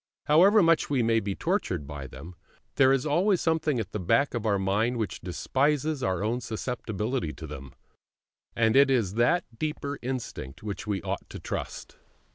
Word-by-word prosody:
However 190 +7 +6
much 165 -1 +3
we 135 -4 +2
may 115 0 +3
be 100 -3 -3
tortured 75 - -1
by 70 -1 -7
them, 70 +8 -10 0.4
there 135 -1 +5
is 135 0 +1
always 180 +6 +2
something 160 -5 +1
at 105 -3 -4
the 105 - -3
back 140 +10 +2
of 115 -2 -2
our 100 -2 +3
mind 105 +6 0
which 110 -5 -3
despises 140 - 0
our 95 -3 0
own 120 +4 -1
susceptibility 115 - -3
to 80 - -9
them; 70 -3 -9 0.8
and 110 0 +2
it 140 0 +6
is 115 -8 +1
that 155 +10 +2
deeper 150 -2 -3
instinct 120 - -5
which 105 0 -5
we 100 -3 -2
ought - - -4
to - - -8
trust. - - -6
120 Hz, 175 wpm, -27 LUFS, 100-145 Hz, 0.8 s, However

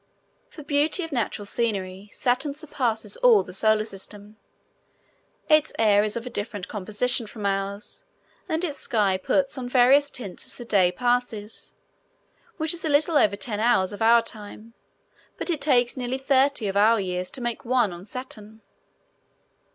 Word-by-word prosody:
For 305 - -11
beauty 295 +5 +1
of 325 - -6
natural 230 -5 -2
scenery, 200 -3 -2
Saturn 255 +3 -1
surpasses 275 - -2
all - - +5
the 180 - -11
Solar 215 +2 +2
System. 205 +1 -9 1.1
Its 305 -1 +4
air 210 -2 +4
is 210 -1 -2
of 235 +1 -4
a - - -5
different 205 -3 -4
composition 215 +4 -1
from 210 -1 -8
ours, 200 - -3 0.5
and 320 +2 0
its 295 -4 -3
sky 200 -4 +1
puts 275 +6 0
on 245 -1 -5
various 265 +3 +5
tints 220 -10 -5
as - - -9
the 240 - -9
day 190 -5 +3
passes, 240 -1 -2 0.8
which 315 +1 0
is 335 - -6
a 320 - -1
little 300 +3 +2
over 205 -8 +4
ten 210 0 -4
hours 215 -4 +2
of 205 - -9
our 230 +1 +5
time, 220 0 -8 0.6
but - - -2
it 310 -4 -2
takes 245 -5 +2
nearly 255 0 -3
thirty 270 -3 +2
of 195 - -3
our 220 +3 +4
years 180 -1 -3
to - - -6
make 240 -1 -3
one 240 -6 +1
on 175 +1 -10
Saturn. 220 -1 -9
230 Hz, 165 wpm, -24 LUFS, 205-270 Hz, 1.1 s, all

